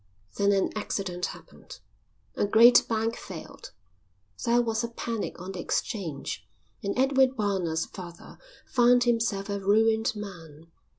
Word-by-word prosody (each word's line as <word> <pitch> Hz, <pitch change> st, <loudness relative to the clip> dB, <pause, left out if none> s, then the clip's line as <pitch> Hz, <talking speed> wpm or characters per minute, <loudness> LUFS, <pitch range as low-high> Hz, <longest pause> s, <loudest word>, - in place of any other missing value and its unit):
Then 200 Hz, 0 st, +2 dB
an 195 Hz, -1 st, +1 dB
accident 190 Hz, -4 st, -3 dB
happened. -, -, -12 dB, 0.5 s
A -, -, 0 dB
great 230 Hz, +4 st, +7 dB
bank 225 Hz, 0 st, 0 dB
failed, -, -, -10 dB, 0.7 s
there 235 Hz, +1 st, +3 dB
was 225 Hz, -1 st, 0 dB
a -, -, -1 dB
panic 230 Hz, -4 st, -4 dB
on 185 Hz, +2 st, -6 dB
the 185 Hz, -, -7 dB
exchange, 170 Hz, -, -3 dB, 0.4 s
and 200 Hz, +3 st, -3 dB
Edward 265 Hz, 0 st, +3 dB
Barnard's 185 Hz, -6 st, 0 dB
father 175 Hz, -3 st, -11 dB, 0.3 s
found 245 Hz, 0 st, +4 dB
himself 230 Hz, -4 st, 0 dB
a 200 Hz, -1 st, -3 dB
ruined 220 Hz, +3 st, +2 dB
man. 165 Hz, -6 st, -10 dB
210 Hz, 130 wpm, -27 LUFS, 190-235 Hz, 0.7 s, great